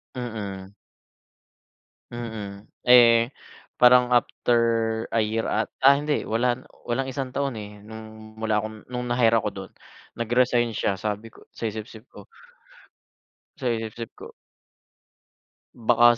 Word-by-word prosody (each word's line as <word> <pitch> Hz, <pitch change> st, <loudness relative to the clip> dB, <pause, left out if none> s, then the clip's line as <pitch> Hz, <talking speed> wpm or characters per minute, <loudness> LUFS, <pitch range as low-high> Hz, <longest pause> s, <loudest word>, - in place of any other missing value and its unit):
Mm. 100 Hz, -6 st, -6 dB, 1.4 s
Mm, 110 Hz, -4 st, -7 dB, 0.2 s
eh, 115 Hz, -1 st, +7 dB, 0.5 s
parang 125 Hz, 0 st, +6 dB
after 120 Hz, 0 st, +2 dB, 0.6 s
a 115 Hz, -, +3 dB
year 110 Hz, +1 st, -1 dB
at 110 Hz, -, 0 dB
ah, 135 Hz, +1 st, +7 dB
hindi 145 Hz, +1 st, -1 dB
wala 120 Hz, +2 st, +1 dB, 0.3 s
walang 130 Hz, +3 st, 0 dB
isang 135 Hz, 0 st, -4 dB
taon, 140 Hz, +1 st, -2 dB
eh, 105 Hz, -2 st, -8 dB
nung 110 Hz, 0 st, -11 dB
wala 110 Hz, -1 st, +1 dB
akong 110 Hz, 0 st, -4 dB
nung 125 Hz, 0 st, -3 dB
na-hire 120 Hz, -2 st, +3 dB
ako -, -, 0 dB
do'n, -, -, -8 dB, 0.5 s
nag-resign 120 Hz, 0 st, +2 dB
siya. 100 Hz, -2 st, -1 dB
Sabi 105 Hz, +3 st, -4 dB
ko, -, -, -19 dB
sa 115 Hz, -, -3 dB
isip-isip 110 Hz, +2 st, -9 dB
ko -, -, -13 dB, 1.3 s
sa 130 Hz, -4 st, -2 dB
isip-isip 115 Hz, 0 st, -5 dB
ko. -, -, -10 dB, 1.5 s
Baka 120 Hz, 0 st, +5 dB
115 Hz, 120 wpm, -25 LUFS, 110-125 Hz, 1.5 s, eh